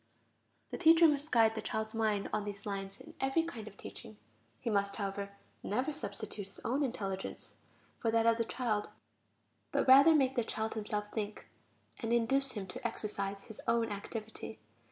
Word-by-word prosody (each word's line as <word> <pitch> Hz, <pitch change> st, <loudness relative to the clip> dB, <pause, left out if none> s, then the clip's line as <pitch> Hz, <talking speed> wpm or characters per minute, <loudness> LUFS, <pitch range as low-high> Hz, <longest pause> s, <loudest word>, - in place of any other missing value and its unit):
The -, -, -4 dB
teacher 330 Hz, -1 st, +8 dB
must 295 Hz, 0 st, 0 dB
guide 225 Hz, -2 st, +5 dB
the 220 Hz, -, -3 dB
child's 220 Hz, +1 st, -3 dB
mind 215 Hz, -3 st, +1 dB
on 215 Hz, -1 st, +1 dB
these 200 Hz, -1 st, -6 dB
lines 195 Hz, -1 st, -4 dB
in -, -, -12 dB
every 270 Hz, +5 st, +2 dB
kind 230 Hz, -10 st, -6 dB
of 200 Hz, -, -11 dB
teaching; 105 Hz, -, -10 dB, 0.4 s
he -, -, -8 dB
must, 200 Hz, -2 st, +1 dB
however, 200 Hz, -1 st, -4 dB, 0.2 s
never 255 Hz, +8 st, -1 dB
substitute 210 Hz, -7 st, -5 dB
his 195 Hz, -, -12 dB
own 260 Hz, +5 st, +1 dB
intelligence 195 Hz, -8 st, -3 dB, 0.5 s
for 230 Hz, -, +1 dB
that 225 Hz, 0 st, +3 dB
of 230 Hz, 0 st, +5 dB
the -, -, +3 dB
child, 220 Hz, -4 st, -1 dB, 0.8 s
but -, -, +1 dB
rather 275 Hz, +5 st, +9 dB
make 265 Hz, -3 st, +3 dB
the 240 Hz, -, +2 dB
child 220 Hz, 0 st, -2 dB
himself 210 Hz, -1 st, -3 dB
think, 215 Hz, -1 st, -4 dB, 0.5 s
and 230 Hz, -1 st, -2 dB
induce 255 Hz, +3 st, +2 dB
him 205 Hz, -3 st, -4 dB
to 190 Hz, +6 st, -3 dB
exercise 200 Hz, -3 st, -3 dB
his 220 Hz, -, -10 dB
own 230 Hz, -1 st, +2 dB
activity. 215 Hz, +2 st, -6 dB
220 Hz, 175 wpm, -33 LUFS, 205-250 Hz, 0.8 s, rather